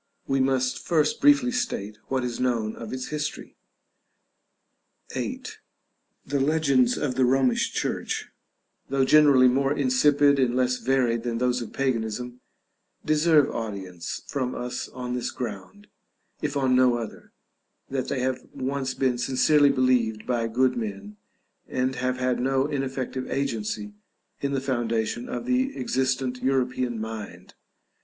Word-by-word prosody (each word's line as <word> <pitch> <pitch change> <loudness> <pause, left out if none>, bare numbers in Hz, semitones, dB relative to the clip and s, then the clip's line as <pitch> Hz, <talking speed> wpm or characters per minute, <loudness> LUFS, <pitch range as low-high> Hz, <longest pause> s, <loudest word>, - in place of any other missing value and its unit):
We 135 0 0
must 130 -1 +1
first 155 -3 +1
briefly 280 -3 +5
state 110 - -3
what 130 -1 -1
is 120 -1 -3
known 115 -4 0
of 115 - -8
its 130 0 -4
history. 150 0 -4 1.6
§ - - -12
VIII. - - -3 0.8
The 140 +1 -1
legends 140 -3 +3
of 135 -3 -1
the 130 +1 +2
Romish 130 0 +2
Church, - - -2 0.6
though 135 0 +2
generally 140 -3 +6
more 135 +2 +2
insipid 140 +1 +3
and 125 -2 +2
less 125 0 +1
varied 125 -3 +1
than 115 -1 -2
those 125 +1 +1
of 115 - -7
Paganism, 125 -1 -2 0.6
deserve 155 -1 +4
audience 95 -6 -5
from 130 -3 -3
us 125 0 -4
on 125 -1 -5
this 125 -1 -2
ground, 100 -4 -7 0.6
if - - -2
on 130 -2 +2
no 125 -1 +5
other, 115 -3 -8 0.6
that 130 -1 -3
they 130 - -2
have 130 0 -1
once 135 0 -2
been 130 -2 +1
sincerely 140 +3 +4
believed 125 -5 +1
by 120 -2 0
good 125 +3 +2
men, 105 -2 -5 0.5
and 130 0 -1
have 130 0 -1
had 125 0 0
no 135 +1 +1
ineffective 135 -3 -3
agency 110 -6 -2 0.5
in 140 0 -1
the 135 - 0
foundation 120 -3 -1
of 120 - -4
the 260 +2 0
existent 130 - -1
European 125 -3 0
mind. 110 -1 -7
130 Hz, 140 wpm, -25 LUFS, 120-135 Hz, 1.6 s, generally